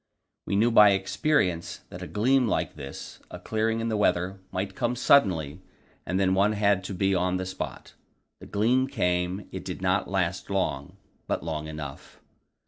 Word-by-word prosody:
We -, -, 0 dB
knew 115 Hz, +4 st, +3 dB
by 105 Hz, -3 st, +7 dB
experience 95 Hz, -, 0 dB
that -, -, -9 dB
a -, -, -5 dB
gleam 125 Hz, +4 st, +2 dB
like -, -, -1 dB
this, 70 Hz, -2 st, -9 dB
a -, -, -8 dB
clearing 110 Hz, +1 st, -1 dB
in 115 Hz, -, -1 dB
the 110 Hz, -, 0 dB
weather, 95 Hz, -1 st, +1 dB
might 95 Hz, +1 st, -3 dB
come 120 Hz, +2 st, -1 dB
suddenly, 95 Hz, -, +3 dB, 0.5 s
and 95 Hz, +1 st, 0 dB
then 95 Hz, -1 st, +3 dB
one 100 Hz, +3 st, +3 dB
had 100 Hz, -2 st, +2 dB
to 95 Hz, -, -5 dB
be 95 Hz, +2 st, +1 dB
on 90 Hz, 0 st, +1 dB
the 95 Hz, -, -3 dB
spot. 95 Hz, 0 st, -6 dB, 0.5 s
The -, -, -11 dB
gleam 125 Hz, +6 st, +2 dB
came; 90 Hz, -6 st, -1 dB
it -, -, -6 dB
did -, -, -6 dB
not 95 Hz, +1 st, +1 dB
last 95 Hz, -1 st, -1 dB
long, 80 Hz, -8 st, -2 dB, 0.3 s
but -, -, -2 dB
long 80 Hz, -2 st, -4 dB
enough. 75 Hz, -3 st, -8 dB
95 Hz, 175 wpm, -27 LUFS, 90-110 Hz, 0.5 s, by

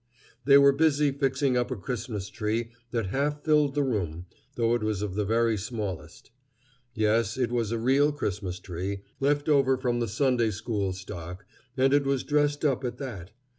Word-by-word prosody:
They 140 Hz, 0 st, +8 dB
were 140 Hz, 0 st, +7 dB
busy 150 Hz, 0 st, +2 dB
fixing 135 Hz, -1 st, 0 dB
up 125 Hz, 0 st, +1 dB
a 130 Hz, -, -2 dB
Christmas 105 Hz, -3 st, -5 dB
tree 110 Hz, +2 st, -2 dB, 0.2 s
that 115 Hz, -5 st, -2 dB
half 145 Hz, +2 st, -1 dB
filled 150 Hz, -3 st, +3 dB
the 145 Hz, -, +2 dB
room, 90 Hz, -, -2 dB, 0.3 s
though 115 Hz, -1 st, +2 dB
it 120 Hz, -, 0 dB
was 105 Hz, -2 st, -1 dB
of 100 Hz, -3 st, -3 dB
the 105 Hz, +1 st, -1 dB
very 115 Hz, +1 st, +2 dB
smallest. 100 Hz, -, -6 dB, 0.6 s
Yes, 110 Hz, +1 st, +1 dB
it 125 Hz, -3 st, 0 dB
was 115 Hz, -3 st, -1 dB
a 115 Hz, -, 0 dB
real 135 Hz, +6 st, +3 dB
Christmas 100 Hz, -10 st, -3 dB
tree, 95 Hz, +2 st, -5 dB, 0.2 s
left 145 Hz, +2 st, +1 dB
over 135 Hz, -3 st, +4 dB
from 125 Hz, -2 st, -1 dB
the 120 Hz, -, -1 dB
Sunday 120 Hz, +1 st, +1 dB
school 105 Hz, -2 st, -2 dB
stock, 90 Hz, 0 st, -8 dB, 0.3 s
and 135 Hz, +1 st, +3 dB
it 145 Hz, -1 st, +3 dB
was 135 Hz, -1 st, 0 dB
dressed 145 Hz, 0 st, +1 dB
up 135 Hz, -2 st, +1 dB
at 125 Hz, -, -3 dB
that. 105 Hz, -11 st, -7 dB
120 Hz, 180 wpm, -27 LUFS, 105-140 Hz, 0.6 s, They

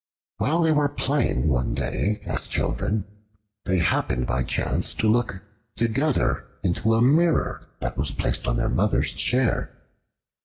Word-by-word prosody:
While 165 Hz, +5 st, +1 dB
they 160 Hz, -, +3 dB
were 150 Hz, -1 st, +2 dB
playing 140 Hz, -, 0 dB
one 60 Hz, 0 st, 0 dB
day 105 Hz, +1 st, -1 dB
as -, -, 0 dB
children, 105 Hz, -1 st, -1 dB, 0.6 s
they 95 Hz, -, +1 dB
happened 65 Hz, -7 st, +1 dB
by 65 Hz, +1 st, 0 dB
chance -, -, 0 dB
to 110 Hz, -, 0 dB
look 110 Hz, -4 st, +1 dB, 0.3 s
together 130 Hz, +6 st, 0 dB, 0.2 s
into 110 Hz, +5 st, +1 dB
a 115 Hz, -, +3 dB
mirror 160 Hz, +5 st, +2 dB
that -, -, -3 dB
was 70 Hz, +2 st, 0 dB
placed 70 Hz, -, -2 dB
on -, -, +1 dB
their -, -, 0 dB
mother's -, -, +1 dB
chair. 125 Hz, -1 st, 0 dB
110 Hz, 145 wpm, -24 LUFS, 85-140 Hz, 0.6 s, they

